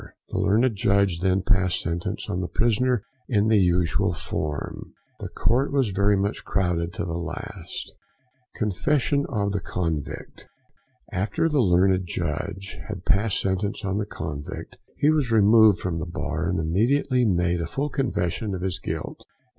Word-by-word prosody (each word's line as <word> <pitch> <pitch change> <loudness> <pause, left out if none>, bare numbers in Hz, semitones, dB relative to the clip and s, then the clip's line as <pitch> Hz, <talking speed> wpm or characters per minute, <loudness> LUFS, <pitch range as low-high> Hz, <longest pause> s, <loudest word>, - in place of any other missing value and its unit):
The - - -2
Learned 110 +4 +3
Judge 100 -3 +2
then 95 +1 +1
passed 95 -4 +2
sentence 85 0 -3
on 90 - -2
the 90 - -2
prisoner 120 +1 +1 0.2
in 110 -2 +2
the 110 -2 +5
usual 90 -2 +2
form. 75 -1 -4 0.3
The - - -5
court 125 +5 +1
was 135 -7 +1
very 100 +1 +3
much 100 +2 -2
crowded 90 -3 0
to - - -3
the 85 - -4
last. 85 -1 -6 0.6
THE - - -12
CONFESSION 140 +7 +1
OF 100 -6 0
THE 100 - -1
CONVICT. 80 -6 -4 0.6
After 105 - 0
the 150 -4 +2
Learned 95 -1 +3
Judge 85 +4 -4
had - - -6
passed 100 +1 +2
sentence 100 +2 -1
on 95 +1 0
the 105 - -2
convict, 75 -6 -6 0.2
he 150 - +4
was 150 -5 +1
removed 110 -1 +6
from 85 -2 -3
the 80 - -4
bar, 85 -1 -2
and 90 - 0
immediately 125 - +2
made 90 -4 +1
a 80 - -2
full 140 - -2
confession 105 - -1
of 90 - -5
his 95 0 -1
guilt. 80 -3 -5
95 Hz, 160 wpm, -25 LUFS, 90-110 Hz, 0.6 s, removed